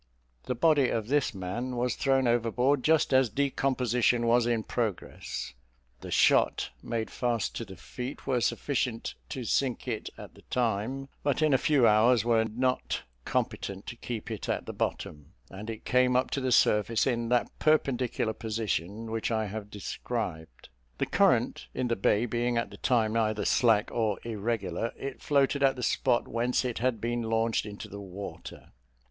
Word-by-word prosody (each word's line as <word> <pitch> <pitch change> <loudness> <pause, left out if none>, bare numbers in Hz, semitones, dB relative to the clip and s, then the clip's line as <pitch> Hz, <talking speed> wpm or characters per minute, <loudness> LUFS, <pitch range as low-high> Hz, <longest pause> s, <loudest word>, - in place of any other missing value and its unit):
The 125 - -2
body 145 0 +4
of 110 0 -2
this 145 -1 +2
man 115 +8 -4
was 120 0 0
thrown 135 -2 +2
overboard 120 +3 +2
just 155 -3 +3
as 130 -2 +5
decomposition 125 -2 +1
was 120 0 +3
in 115 -2 +1
progress: 110 -6 -4 0.5
the - - -9
shot - - +3
made 115 -2 -3
fast 120 -4 -1
to 115 - -4
the 95 -2 -10
feet 125 +9 -7
were 130 -3 +1
sufficient 120 -1 -1 0.2
to 130 - -4
sink 125 +1 0
it - - -3
at - - -10
the - - -17
time; 125 +3 -1
but 145 +2 +1
in 155 -2 +4
a - - +6
few 140 -6 +4
hours 110 +2 +5
after 120 - -4
were 115 -1 +4
not 125 +3 -1 0.2
competent 100 0 -2
to 120 - -6
keep 115 -2 -6
it - - -5
at - - -1
the - - -6
bottom, 75 +3 -4 0.2
and 105 +3 -8
it 110 -1 -7
came 125 0 +3
up 130 +1 +1
to 140 - -1
the 130 -1 0
surface 110 -1 +3
in 120 -3 0
that 125 -1 +2
perpendicular 130 -7 +1
position 110 -1 -3
which 115 0 -1
I 110 -2 0
have 105 0 -6
described. 95 - -5 0.3
The - - 0
current - - +2
in 125 - -1
the 115 - +2
bay 105 +3 +2
being 120 +1 0
at 115 - -1
the - - -10
time 115 -3 +1
either 110 -2 +1
slack 115 -3 +3
or 110 -4 0
irregular, 110 -2 -2
it 135 -1 -6
floated 140 -1 +2
at 135 -1 +4
the 125 - -6
spot 120 - +1
whence 120 +3 0
it 125 -2 -2
had 125 -2 0
been 120 +1 -1
launched 115 -1 0
into 105 0 -8
the 100 0 -8
water. 100 +1 -9
120 Hz, 175 wpm, -29 LUFS, 110-125 Hz, 0.5 s, a